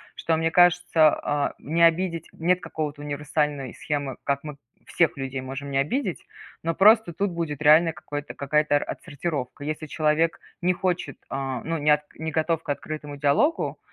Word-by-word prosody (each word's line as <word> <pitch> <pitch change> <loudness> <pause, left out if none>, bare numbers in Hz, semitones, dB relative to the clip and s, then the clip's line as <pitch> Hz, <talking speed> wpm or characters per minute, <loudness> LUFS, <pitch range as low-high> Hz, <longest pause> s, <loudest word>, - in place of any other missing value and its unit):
что 165 - 0
мне 165 0 0
кажется, 175 -3 +5
а, 145 0 -1
не 165 +3 -2
обидеть- 165 0 +1
нет 180 +2 +1
какого-то 150 -5 -4
универсальной 145 -2 -2
схемы, 145 -3 -3
как 140 0 -1
мы 150 -2 -7 0.3
всех 165 -4 +1
людей 135 -1 -4
можем 135 +2 -6
не 135 - 0
обидеть. 185 - -1 0.4
Но 165 0 -1
просто 215 -1 +5
тут 195 +2 -1
будет 160 -4 -4
реальное 160 +2 +6
какое-то 145 -1 -6
какая-то 150 +1 +2
отсортировка. 145 -3 -4
Если 155 +1 -4
человек 155 +2 +1 0.2
не 180 +1 +2
хочет, 175 -6 -2
а, 135 -2 -3
ну, 165 0 -2
не 150 0 0
от 150 0 +4
не 160 +1 -4
готов 160 +1 0
к - - -12
открытому 150 0 -5
диалогу, 145 - +1
155 Hz, 165 wpm, -25 LUFS, 145-165 Hz, 0.4 s, реальное